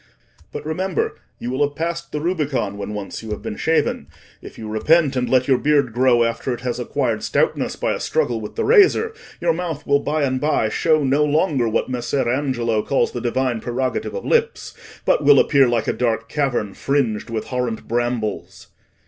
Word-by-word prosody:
But, - - -7
remember, 180 +3 -2 0.2
you 120 - -5
will 130 +3 -2
have 145 0 +1
passed 170 +2 -3
the 150 - -2
Rubicon, 150 - -1
when 100 +1 -5
once 100 -1 -6
you 110 - -9
have 105 - -5
been - - -4
shaven: 160 +5 0 0.3
if - - -11
you 110 - -7
repent, 140 +7 +2
and 125 -1 -1
let 130 -1 +3
your 130 -3 +3
beard 145 -5 +2
grow 120 -1 +4
after 115 +3 -2
it - - -13
has 125 0 -3
acquired 125 -2 -1
stoutness - - 0
by - - -1
a - - -4
struggle 115 -2 -1
with 105 - -8
the - - -1
razor, 445 +1 +4 0.3
your 170 -1 +2
mouth 165 -3 -4
will 140 0 +3
by 150 +1 -1
and 130 -2 0
by 145 -7 +1
show 155 +6 +2
no 140 +2 +2
longer 150 -4 +1
what 110 - 0
Messer 125 +1 -1
Angelo 120 -4 0
calls 135 - 0
the 120 - -5
divine 125 -1 -1
prerogative 125 - -2
of 485 - -5
lips, 465 0 0 0.3
but - - +2
will 140 0 +7
appear 140 -2 +4
like 120 -2 0
a - - +1
dark 115 -2 -1
cavern 125 -8 -1
fringed 125 -6 -1
with 110 -2 -4
horrent 125 -3 -3
brambles." 120 -2 -3
130 Hz, 195 wpm, -21 LUFS, 120-150 Hz, 0.3 s, will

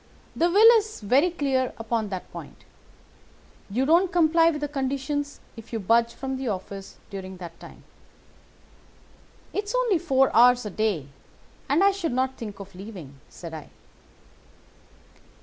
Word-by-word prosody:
The 340 - +2
will 415 +5 +7
is 435 +1 -7
very 260 - +3
clear 270 -6 -1
upon 225 -1 -2
that 190 -2 -6
point. - - -10 1.1
You 245 +7 0
don't 340 +5 +4
comply 330 -1 +4
with 300 -2 -2
the 295 - -1
conditions 280 +1 -3 0.2
if 225 -1 -12
you 225 - -2
budge 230 +3 +2
from 265 0 -4
the 260 -1 -4
office 195 -1 -6
during 190 -1 -7
that 170 -2 -10
time.' - - -13 1.7
"'It's 415 +3 -2
only 475 -8 +2
four 270 -6 +2
hours 245 0 +6
a 210 - -4
day, 200 -9 -1 0.6
and 300 +7 +3
I 400 - +6
should 350 -8 -3
not 260 +1 0
think 210 -4 -8
of 195 0 -10
leaving,' 180 -8 -10
said 165 -2 -10
I. 155 -2 -8
260 Hz, 150 wpm, -25 LUFS, 205-320 Hz, 1.7 s, will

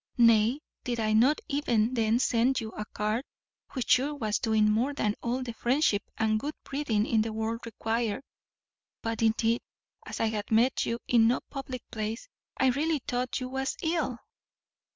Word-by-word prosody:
Nay, 230 +3 +5 0.2
did 240 -2 -2
I 215 -1 +1
not 255 +8 +4
even 250 -6 +1
then 225 -1 +2
send 250 +1 +2
you 220 -2 -5
a 210 - -5
card, 215 +4 -2 0.5
which 255 -4 -2
sure 280 +4 +3
was 215 -6 -1
doing 220 -2 +3
more 235 +7 +1
than 210 -7 +1
all 245 +2 -1
the 240 -2 -5
friendship 240 -3 +2 0.2
and 215 -1 +2
good 295 +6 -4
breeding 255 -7 0
in 225 -2 +2
the 220 +1 -2
world 220 +1 -2
required; 225 +1 -2 0.8
but, 225 0 -2
indeed, 225 +1 +2 0.5
as - - -5
I - - +2
had 215 -2 -2
met 235 +4 +3
you 230 - -1
in 230 -2 +5
no 245 - +2
public 265 -3 -5
place, 220 - -4 0.3
I 265 - +4
really 295 +2 0
thought 250 +1 -1
you 255 -1 -4
was 265 +1 -2
ill." 320 -7 0
235 Hz, 170 wpm, -29 LUFS, 220-260 Hz, 0.8 s, Nay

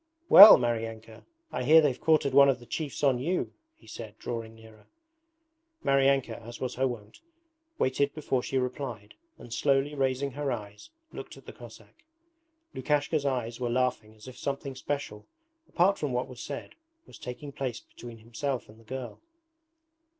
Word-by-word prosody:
'Well, 205 +3 +12
Maryanka! 115 -1 -4 0.2
I - - -3
hear 155 +6 +7
they've 145 -5 +1
quartered 155 -4 +2
one 140 0 +7
of 135 - +2
the 120 - -14
chiefs 150 +2 -5
on 135 -3 +3
you?' 170 +8 -2 0.2
he - - -23
said, 110 -2 -10
drawing 115 -2 -6
nearer. 110 -1 -17 1.0
Maryanka, 135 -4 +2
as 115 +1 -10
was 130 - -3
her 130 +1 0
wont, 110 -4 -8 0.6
waited 140 +2 0
before 135 -4 -1
she 135 - -3
replied, 125 -5 -4 0.2
and 120 - -10
slowly 140 +2 +1
raising 135 0 -1
her 140 +1 -3
eyes 105 -3 -7 0.2
looked - - -9
at - - -16
the - - -10
Cossack. - - -15 0.7
Lukashka's 145 +2 0
eyes 120 -3 -3
were 120 -1 -2
laughing 120 -3 -1
as 110 +3 -15
if 130 - -11
something 140 -1 -4
special, 130 -6 -5 0.4
apart 190 +3 +2
from 145 -4 -2
what 125 +1 -1
was 125 -2 -10
said, 140 - -7 0.3
was - - -15
taking 125 +4 -8
place 130 -4 -4
between 120 -1 -12
himself 120 +4 -4
and 110 +1 -16
the - - -19
girl. 130 +1 -7
130 Hz, 165 wpm, -28 LUFS, 115-140 Hz, 1.0 s, Well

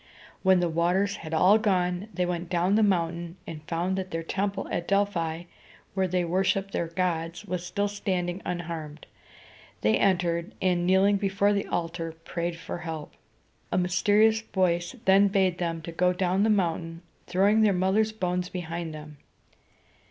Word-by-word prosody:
When 190 -2 +4
the 175 - +2
waters 180 +5 +1
had 160 - -9
all 185 +7 +5
gone, 185 -2 0
they 180 -3 -1
went 175 -1 -3
down 180 +1 +1
the 220 - +4
mountain, 170 -3 0
and 155 -2 -7
found 180 +3 -1
that 190 0 -5
the 165 -1 -3
temple 195 +3 -2
at 170 - -2
Del´phi, 175 -5 0 0.5
where 190 -1 +1
they 180 0 0
worshiped 190 +2 0
their 170 - -1
gods, 165 +1 -2
was 180 -2 -3
still 200 +3 -1
standing 185 -2 -2
unharmed. 160 -3 -5 0.8
They 110 +1 +3
entered, 175 -2 +1
and, 180 -2 +1
kneeling 195 +2 +4
before 200 +1 +1
the 200 0 -1
altar, 165 -1 -3
prayed 170 -1 -3
for 170 +1 -6
help. 160 -3 -6 0.6
A - - +1
mysterious 205 +5 +3
voice 180 -1 0
then 195 +1 +6
bade 190 -3 +1
them 165 -2 -2
go 180 0 +3
down 185 +1 +1
the 220 - +3
mountain, 170 -4 -1 0.2
throwing 200 +4 +3
their 215 -2 +5
mother's 195 +4 +2
bones 180 -3 -2
behind 170 -2 -5
them. 150 -1 -10
180 Hz, 160 wpm, -27 LUFS, 170-195 Hz, 0.8 s, then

